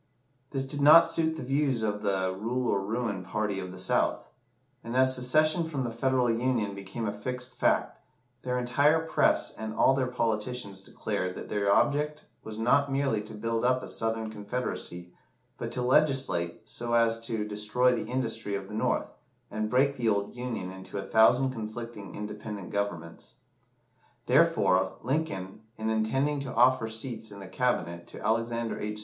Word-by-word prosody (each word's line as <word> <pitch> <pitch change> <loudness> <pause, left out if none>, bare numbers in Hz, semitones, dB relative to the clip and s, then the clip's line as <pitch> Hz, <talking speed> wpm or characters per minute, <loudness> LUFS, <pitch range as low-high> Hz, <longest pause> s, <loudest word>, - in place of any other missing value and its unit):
This 135 -2 -1
did 145 +2 -4
not 155 +4 +9
suit 160 -1 0
the - - -5
views 135 -3 +1
of 105 -1 -1
the 95 -2 0
"rule 120 +5 -2
or 100 -1 0
ruin" 110 -2 -2
party 100 +1 -2
of 90 -1 -6
the 95 - -10
South; 90 - 0 0.5
and 115 +2 -3
as 130 0 +5
secession 155 +6 +3
from 145 -5 -3
the 120 - -3
Federal 125 +1 +1
Union 115 -3 0
became 100 +4 -5
a 100 - -2
fixed 125 +4 -5
fact, - - +1 0.4
their 125 0 -2
entire 145 +6 +3
press - - +2
and 110 0 -6
all 135 - +5
their 130 -1 0
politicians 115 -4 -2
declared 90 -1 -3
that - - -8
their 100 -1 +1
object 150 +6 +1 0.2
was 110 -1 -7
not 140 +5 +3
merely 135 -6 +1
to 110 +1 -9
build 115 +1 -2
up 130 +1 +2
a - - -6
Southern 115 -1 -2
Confederacy, 105 -5 -4 0.5
but - - -4
to 125 - -2
legislate 130 - +1
so 120 0 -4
as 115 -1 +3
to 110 -2 -2
destroy 105 +4 +2
the 115 - -3
industry 115 -5 -2
of 100 -1 -5
the - - -8
North, 110 - 0 0.4
and 110 0 -2
break 140 +4 +2
the 120 -3 +1
old 100 +1 -1
Union 120 -7 -4
into 95 +1 -8
a 95 - -3
thousand 125 +4 +4
conflicting 110 -3 -7
independent 105 -2 -6
governments. 85 -5 -4 0.9
Therefore, - - +3
Lincoln, 115 -9 -2 0.2
in 110 0 -1
intending 135 +7 +1
to 135 -2 -5
offer 125 -1 +4
seats 110 0 -4
in 100 -1 -10
the 100 - -9
Cabinet 90 -6 -1
to - - -9
Alexander 115 +1 0
H. 105 0 -4
115 Hz, 170 wpm, -28 LUFS, 105-130 Hz, 0.9 s, not